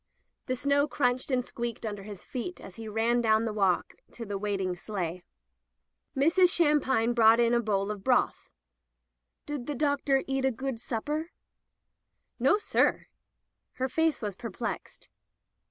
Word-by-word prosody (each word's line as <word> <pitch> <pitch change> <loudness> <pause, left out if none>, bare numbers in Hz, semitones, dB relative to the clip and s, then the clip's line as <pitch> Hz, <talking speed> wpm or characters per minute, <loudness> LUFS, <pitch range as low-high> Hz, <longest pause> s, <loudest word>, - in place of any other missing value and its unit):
'* - - -53
The 255 - 0
snow 280 +3 +2
crunched 250 -2 0
and 250 -2 +1
squeaked 235 -1 -5
under 205 -2 -4
his 200 -2 -9
feet 260 +9 -5
as 190 - -11
he 225 -1 -7
ran 225 +3 +1
down 220 0 +3
the 220 - -2
walk 195 -4 +1 0.2
to 235 - -7
the 205 -1 -4
waiting 195 -3 -1
sleigh. 180 -2 -4 0.9
Mrs. 335 +6 +5
Shampine 290 -8 +3
brought 225 0 +6
in 235 0 +3
a 240 - +4
bowl 205 -3 0
of 205 -2 -7
broth. 255 -1 +1 1.0
"Did 290 -5 -5
the 295 - -2
doctor 280 -1 +1
eat 270 0 -1
a 265 - +4
good 265 0 -4
supper?" 295 +8 -3 1.1
"Nossir." 415 0 +2 0.6
Her 260 - -1
face 320 -1 0
was 205 -3 -3
perplexed. 230 +2 -6
240 Hz, 150 wpm, -29 LUFS, 210-275 Hz, 1.1 s, brought